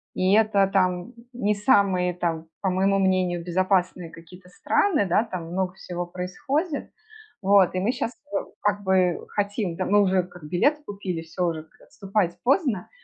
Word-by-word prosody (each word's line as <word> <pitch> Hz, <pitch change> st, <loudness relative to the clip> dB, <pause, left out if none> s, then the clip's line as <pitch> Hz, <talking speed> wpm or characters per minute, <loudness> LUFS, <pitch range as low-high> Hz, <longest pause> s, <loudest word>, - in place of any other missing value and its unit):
и 185 Hz, +1 st, +2 dB
это 215 Hz, -2 st, +4 dB
там, 185 Hz, +3 st, 0 dB, 0.2 s
не 210 Hz, -4 st, 0 dB
самые, 200 Hz, -5 st, +3 dB
там, 165 Hz, -2 st, -2 dB
по 195 Hz, -, +1 dB
моему 195 Hz, +2 st, +2 dB
мнению, 185 Hz, -2 st, +1 dB
безопасные 180 Hz, -1 st, 0 dB
какие-то 170 Hz, +3 st, -15 dB
страны, 300 Hz, -, +1 dB
да. 185 Hz, +4 st, +2 dB
Там 175 Hz, -7 st, -6 dB
много 185 Hz, 0 st, -1 dB
всего 175 Hz, -2 st, -5 dB
происходит. 280 Hz, -, -3 dB, 0.5 s
Вот 195 Hz, -2 st, +4 dB
и -, -, +1 dB
мы 200 Hz, +6 st, +1 dB
щас, 245 Hz, -2 st, -3 dB, 0.2 s
э, -, -, +2 dB, 0.2 s
как 205 Hz, 0 st, 0 dB
бы, 190 Hz, -1 st, +2 dB
э, 180 Hz, -2 st, +2 dB
хотим, 205 Hz, -3 st, -2 dB
да. 185 Hz, +1 st, -2 dB
Мы 205 Hz, +1 st, +4 dB
уже 190 Hz, -2 st, +2 dB
как 180 Hz, -1 st, -14 dB
билеты 285 Hz, -, +1 dB
купили, 195 Hz, -4 st, -4 dB
всё 165 Hz, +2 st, -3 dB
уже, 160 Hz, -2 st, -3 dB
как 160 Hz, -, -27 dB
отступать 195 Hz, -4 st, -2 dB
поздно. 260 Hz, -, +1 dB
190 Hz, 170 wpm, -25 LUFS, 180-205 Hz, 0.5 s, это